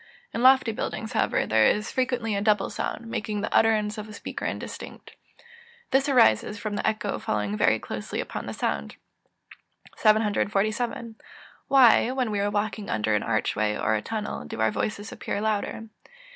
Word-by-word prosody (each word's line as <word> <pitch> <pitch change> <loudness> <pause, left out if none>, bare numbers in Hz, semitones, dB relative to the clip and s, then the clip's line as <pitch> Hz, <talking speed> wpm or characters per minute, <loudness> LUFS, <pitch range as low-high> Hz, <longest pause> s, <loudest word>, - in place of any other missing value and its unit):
In - - -2
lofty 260 -2 +6
buildings, 220 +1 -4
however, - - +1
there 110 0 +4
is 210 +1 0
frequently 245 -4 -1
a 200 - -1
double 210 -1 +2
sound, 235 - -4
making 215 -2 -3
the 215 - -3
utterance 215 -1 +2
of 215 0 -7
a - - -9
speaker - - -6
indistinct. - - -6 0.8
This 270 +2 +3
arises 210 - +4
from 205 0 -4
the - - -1
echo 215 -2 -1
following 105 -1 -2
very 110 - +3
closely 105 -1 -5
upon - - -5
the - - -4
sound. 70 0 -3 1.0
747. 215 +2 +1 0.5
_Why, 255 -1 +5
when 250 -4 0
we 205 - -1
are 200 +1 +1
walking 205 0 -2
under 110 0 0
an 105 - +2
arch 110 -1 0
way 105 -1 0
or 110 - 0
a 110 - 0
tunnel, 210 - -4
do 75 - -7
our 110 0 +2
voices 210 -1 -3
appear - - -4
louder? 215 +1 -2
210 Hz, 170 wpm, -26 LUFS, 195-225 Hz, 1.0 s, lofty